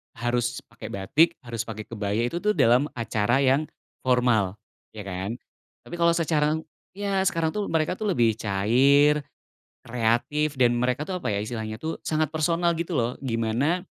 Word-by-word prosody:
Harus 120 +1 -1
pakai - - -11
batik, 155 - +2
harus 115 -3 -5
pakai 110 -1 -7
kebaya, 105 -1 -2
itu 170 +7 -4
tuh 210 - +3
dalam 130 - +3
acara 115 +2 +1
yang 135 +2 +3 0.4
formal, 120 -6 +2 0.3
ya 105 -2 -9
kan. 95 +5 -4 0.5
Tapi - - -6
kalau 170 0 +3
sekarang 160 -2 0 0.2
ya 195 -1 -1
sekarang 165 -3 0
tuh 210 -1 -2
mereka 160 +2 +1
tuh 210 0 -1
lebih 115 - +2
cair, 130 +9 +3 0.6
kreatif 125 +6 0
dan 120 -2 +4
mereka 125 +4 0
tuh 180 -2 -4
apa - - -1
ya 100 - 0
istilahnya 110 0 -4
tuh 160 +4 -5
sangat 155 0 -1
personal 170 +2 +1
gitu 165 0 -2
loh, 120 +1 0
gimana 130 +9 0
130 Hz, 160 wpm, -25 LUFS, 115-160 Hz, 0.6 s, dan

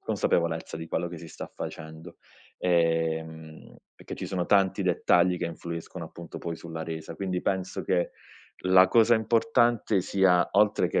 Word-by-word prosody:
consapevolezza 85 -1 -1
di 80 0 -7
quello 85 +2 -2
che 85 - -8
si 85 - -10
sta - - -9
facendo, 80 +1 -8 0.4
ehm, 80 -2 -1 0.2
perché - - -8
ci - - -6
sono 90 -2 -2
tanti 100 0 +3
dettagli 90 0 +3
che 85 - -2
influiscono, 85 +1 -7
appunto, 85 +1 -10
poi 85 - -4
sulla 80 0 -7
resa, 80 0 -6
quindi 95 -1 -2
penso 95 -1 -2
che 90 -2 0 0.6
la 95 0 +7
cosa 115 +3 +5
importante 115 -2 +2
sia- 90 -2 +3
oltre 105 0 +3
che, - - +1
85 Hz, 155 wpm, -27 LUFS, 80-95 Hz, 0.6 s, la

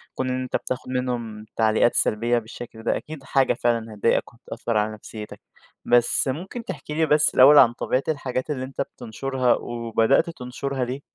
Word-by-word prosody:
كون 130 - -2
إن 130 0 -1
أنت 130 - -4
بتاخد 130 0 -3
منهم 120 -4 -3
تعليقات 110 +1 +3
سلبيّة 120 +3 +2
بالشكل 115 0 -10
ده - - +1
أكيد 155 -3 -9
حاجة 135 -1 +2
فعلًا 115 -2 -1
هتضايقك 105 +4 0
وهتأثر 115 -1 -4
على 105 +1 0
نفسيتك. 105 0 -9 0.5
بس 120 +3 +3
ممكن 180 - -4
تحكي 150 -7 -7
لي 160 +1 +2
بس 150 -1 +3
الأوّل 140 +3 +8
عن 120 -4 +7
طبيعة 130 +2 -1
الحاجات 135 -4 -2
اللي 135 -4 -2
أنت 135 +1 -5
بتنشرها، 130 +1 -1
وبدأت 115 - +1
تنشرها 135 -2 -4
ليه؟ 130 +3 -5
125 Hz, 165 wpm, -24 LUFS, 115-135 Hz, 0.5 s, الأوّل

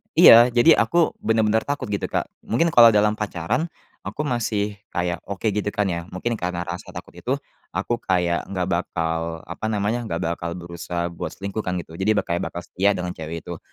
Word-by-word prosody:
iya, 120 +1 +9
jadi 120 +7 +6
aku 165 +9 +3
benar-benar 110 0 +1
takut, 145 -7 -3
gitu, 100 - -1
Kak. - - 0 0.2
Mungkin 165 +9 +2
kalau 120 -6 +9
dalam 105 0 +3
pacaran 105 - -1 0.4
aku - - -4
masih 110 -5 -1 0.2
kayak 90 -1 -1
oke, 100 -1 -6
gitu, 105 0 -2
kan, 105 -1 +1
ya. 85 0 -3
Mungkin 115 +6 -2
karena 90 0 -2
rasa 85 +1 -6
takut - - -8
itu, - - -1 0.4
aku 100 +6 0
kayak 90 -2 +1
nggak 90 -2 -1
bakal, 85 -2 -2
apa 85 - -5
namanya, 105 +3 0
nggak 85 -5 -2
bakal 85 0 -2
berusaha 85 0 -4
buat 85 - -5
selingkuh, 100 +2 -3
kan, 90 - -1
gitu. 80 -1 -13
Jadi 100 +3 +2
ba - - +3
kayak 85 0 -1
bakal 85 - -5
setia 100 +4 +1
dengan 90 -2 -3
cewek 80 +1 -6
itu. - - -5
95 Hz, 190 wpm, -23 LUFS, 85-110 Hz, 0.4 s, iya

